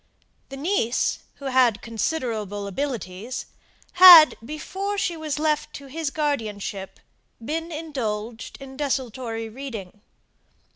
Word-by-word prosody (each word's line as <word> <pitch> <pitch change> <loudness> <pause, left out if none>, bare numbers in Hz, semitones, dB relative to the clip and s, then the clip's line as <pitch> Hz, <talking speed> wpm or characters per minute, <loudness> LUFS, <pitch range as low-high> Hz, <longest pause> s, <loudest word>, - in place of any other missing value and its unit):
The 270 - -8
niece, 280 - 0 0.2
who 280 - -12
had 255 -5 +3
considerable 220 -4 -3
abilities, 225 -1 -4 0.5
had, 355 -4 +10
before 380 - -4
she 355 -3 -1
was 310 -2 -4
left 305 0 -1
to 280 - -9
his 305 +2 -3
guardianship, 215 -10 -3 0.4
been 320 +8 -4
indulged 235 -8 -4
in 265 -1 -10
desultory 250 -5 -3
reading. 220 -5 -8
265 Hz, 105 wpm, -24 LUFS, 225-305 Hz, 0.5 s, had